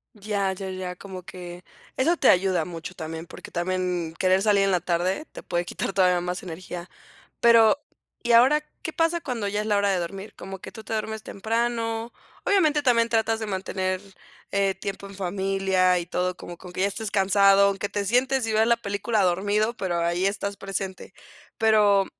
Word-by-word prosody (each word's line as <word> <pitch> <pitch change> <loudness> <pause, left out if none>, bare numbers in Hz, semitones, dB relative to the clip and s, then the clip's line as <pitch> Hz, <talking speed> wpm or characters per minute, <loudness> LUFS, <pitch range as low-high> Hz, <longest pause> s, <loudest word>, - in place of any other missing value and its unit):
Ya, 200 -2 -1
ya, 190 0 -6
ya, 185 -1 -5
como 185 -1 -9
que, 180 0 -9 0.3
eso 330 +7 +2
te - - +4
ayuda 185 -3 +3
mucho 170 +1 -7
también, 160 -1 -6
porque - - -11
también 180 -2 -2
querer 185 +1 +3
salir 205 -2 +4
en 195 - +2
la 180 -2 +2
tarde 180 - -1
te - - -9
puede 175 0 -2
quitar 180 - -3
todavía 180 -2 +3
más 180 0 -4
energía, 175 0 -7 0.5
pero, 230 +2 +6 0.4
y 235 0 +2
ahora 260 +6 +6 0.2
¿qué 320 - -4
pasa 330 +1 +1
cuando 240 -8 -3
ya 205 +1 -1
es - - -5
la 210 - +2
hora 200 0 +2
de 195 - +2
dormir, 195 +4 -6
como 195 0 -8
que 190 - -9
tú 220 - -10
te 220 - -5
duermes 220 0 -3
temprano?, 230 +1 -2 0.3
obviamente 310 -7 +3
también 235 -3 +3
tratas 225 -1 +1
de 220 - -4
mantener, 185 -1 -2 0.5
eh, 195 -1 +1
tiempo 200 0 -6
en 195 - -12
familia 190 -1 +1
y 175 - -3
todo, 180 +1 -2
como 175 - -9
que 180 - -12
aunque 180 +1 -5
ya 195 - +4
estés 210 +2 -4
cansado, 195 0 +5
aunque 200 +1 -3
te 205 -1 -2
sientes 255 +4 +2
y 220 - -2
veas 220 +1 +3
la 235 0 +4
película 205 0 -1
dormido, 205 +5 +1
pero 180 -6 -2
ahí 175 +3 +1
estás 200 0 -3
presente, 195 -1 -5 0.5
pero, 210 -3 +4
195 Hz, 190 wpm, -25 LUFS, 185-220 Hz, 0.5 s, pero